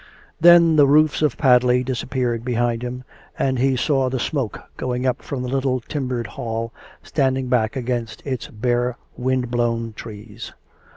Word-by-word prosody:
Then 170 -1 +7
the 145 -2 +6
roofs 155 +2 +4
of 150 -5 +1
Padley 125 -2 +4
disappeared 125 -2 -2
behind 120 -1 0
him, 125 +1 -5 0.3
and 130 -2 0
he 135 +1 +2
saw 135 0 +1
the 130 - -2
smoke 130 -2 -2 0.2
going 125 0 -3
up 130 - 0
from 130 -3 -5
the - - -3
little 130 0 0
timbered 125 -2 -3
Hall, 115 +2 -4 0.3
standing 130 -3 0
back 115 -1 +1
against 120 -2 -3
its 130 -4 -3
bare 120 +2 -1 0.2
wind 125 -1 -1
blown 115 -1 -1
trees. 110 +1 -9
125 Hz, 155 wpm, -21 LUFS, 120-135 Hz, 0.3 s, Then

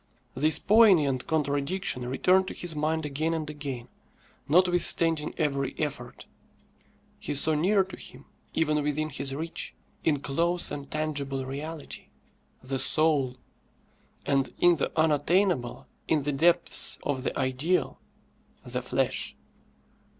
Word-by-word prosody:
This 150 +4 +3
poignant 185 - +4
contradiction 145 -2 -1
returned 185 +9 +3
to - - -6
his 175 -3 -3
mind 155 +1 -1
again 155 +3 -1
and 155 -2 -3
again, 140 -5 -6 0.6
notwithstanding 170 -2 +3
every 140 -4 -1
effort. 140 -5 -5 0.9
He - - -4
saw 155 +3 +3
near 190 +6 +3
to 190 - -10
him, 130 +3 -12 0.3
even 150 -2 +1
within 150 +1 -1
his 135 0 -3
reach, 165 +3 -4 0.3
in 150 -3 +2
close 170 +5 +1
and 140 -1 -6
tangible 140 -3 -2
reality, 145 +3 -7 0.6
the 135 +1 -3
soul; 140 -3 +1 0.9
and 135 -1 +1
in 175 -1 +4
the - - -1
unattainable 160 -2 +1 0.2
in 155 -3 +1
the 145 - 0
depths 170 +5 +2
of 140 -3 -1
the - - -3
ideal 135 +7 0 0.6
the - - -3
flesh. - - -1
150 Hz, 120 wpm, -27 LUFS, 140-165 Hz, 0.9 s, poignant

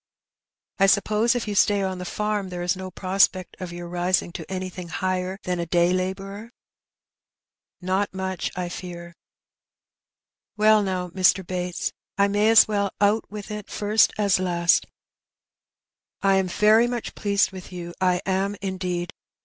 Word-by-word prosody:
" - - -68 0.3
I 195 - +5
suppose 215 +4 +3
if 240 -2 -2
you 210 - -2
stay 200 0 +3
on 190 -1 -3
the 180 - -5
farm 210 0 -2
there 175 -1 -5
is 175 +1 +1
no 185 0 -6
prospect 185 0 +1
of 185 -2 -6
your 175 0 -7
rising 175 0 0
to 180 - -8
anything 185 -1 -5
higher 185 +3 -2
than 180 -1 -2
a 170 - -3
day 175 +1 +3
labourer? 195 +4 -4 0.7
" - - -68 0.3
"Not 190 +3 0
much, 190 -1 -3
I 180 -1 -3
fear." 175 -1 -8 1.4
"Well, 215 0 +5
now, 185 -2 -2
Mr. 185 +1 +3
Bates, 180 -1 -3 0.2
I 200 0 +4
may 205 +2 +2
as 225 -1 +7
well 200 -2 0
out 205 +2 +2
with 210 0 -8
it 210 -1 -6
first 210 +1 +3
as 200 -3 +2
last. 175 -2 +2 1.4
I 195 -1 +4
am 190 -1 +1
very 215 +5 +4
much 240 -1 -4
pleased 200 -1 +1
with 185 -1 -10
you; 175 -1 -7
I 180 -1 +2
am, 195 +2 0
indeed. 185 -3 -3
190 Hz, 160 wpm, -24 LUFS, 180-205 Hz, 1.4 s, as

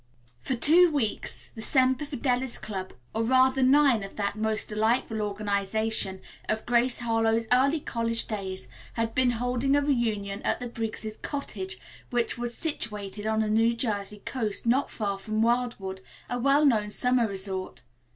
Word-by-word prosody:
For 260 - -2
two 335 +9 +7
weeks 250 -8 -2
the 220 - -8
Semper 260 +4 +3
Fidelis 260 -3 -1
Club, 190 -3 -6 0.2
or, 225 - -1
rather, 260 +3 +3
nine 265 -3 +5
of 195 0 -8
that 200 -1 -2
most 215 0 -2
delightful 220 +1 0
organization 205 -1 -1 0.3
of 220 0 -1
Grace 245 +1 +2
Harlowe's 225 -1 +1
early 275 +5 +3
college 230 -3 -1
days, 190 - -5 0.3
had 230 -1 -2
been 260 -1 +3
holding 245 +3 0
a 285 - +3
reunion 215 -7 -1
at - - 0
the 250 - -5
Briggs' 220 -2 -4
cottage, 195 -10 -5 0.3
which 240 -1 0
was 240 -1 -2
situated 210 -9 -3
on 220 0 +1
the 215 - 0
New 225 +2 +3
Jersey 210 -3 -3
coast, 220 -6 -2
not 255 +4 +2
far 200 -3 -3
from 215 +2 -1
Wildwood, 235 -6 -1 0.3
a 245 - -1
well 280 +4 +4
known 215 -6 +3
summer 250 +2 +2
resort. 190 -1 -4
225 Hz, 155 wpm, -27 LUFS, 210-250 Hz, 0.3 s, two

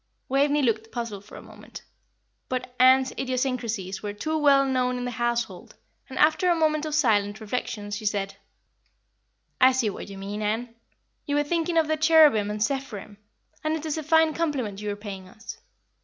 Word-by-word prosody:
Waveney 285 +2 +2
looked 225 -2 0
puzzled 230 -5 -5
for - - -13
a - - -10
moment; - - -12 0.7
but 255 -1 -4
Ann's 260 +1 +5
idiosyncrasies 245 -7 -2
were 205 -1 -4
too 310 +10 -3
well 280 -3 +4
known 250 -1 0
in 245 - -4
the 245 - -3
household, 235 -6 -3 0.3
and 265 - -8
after 315 +4 +3
a 345 - +4
moment 310 -1 +1
of 300 - -2
silent 215 -7 +2
reflection 215 -2 -4
she 210 +1 -3
said, 200 -1 -2 1.3
"I 260 +1 +7
see 240 -5 0
what 195 - -8
you 195 - -9
mean, 200 +2 -5
Ann. 225 +3 -2 0.5
You 285 - 0
were 290 - +3
thinking 335 +2 -1
of 320 -2 +3
the 315 0 0
cherubim 310 -10 +5
and 210 0 -1
seraphim, 220 -6 -4 0.5
and 310 0 0
it 320 0 -5
is 310 - -2
a 315 - -3
fine 320 +1 +3
compliment 265 -12 -2
you 210 - -3
are 205 - -2
paying 200 -3 -8
us." 220 +4 -10
250 Hz, 185 wpm, -25 LUFS, 210-295 Hz, 1.3 s, I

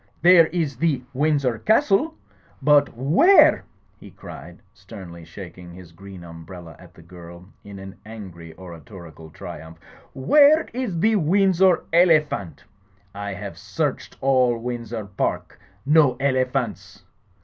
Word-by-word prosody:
There 175 -2 +6
is 155 -6 -3
the 140 -3 -1
Windsor 140 -4 0
Castle. 280 +6 +1 0.4
But 145 -4 +2
where,*' 180 - +4 0.3
he - - -13
cried - - -13
sternly, 85 -3 -12
shaking 90 +1 -12
his 90 -1 -14
green 95 +1 -13
umbrella 85 0 -12
at 90 -1 -17
the 85 - -16
girl 85 +1 -14 0.2
in 100 -1 -11
an 95 0 -11
angry 95 -7 -11
oratorical 85 -3 -12
triumph, 80 +1 -11 0.4
"where 295 - +4
is 235 -9 -4
the 220 +4 +2
Windsor 190 +1 +2
Ele 170 -2 +5
phant? 100 - -8 0.5
I 100 0 -6
have 100 0 -9
searched - - -4
all 130 -3 +2
Windsor 115 -2 -6
Park. 100 -1 -4 0.3
No 145 -4 +3
ele 130 -2 +1
phants." 105 -7 -5
115 Hz, 125 wpm, -22 LUFS, -, 0.5 s, There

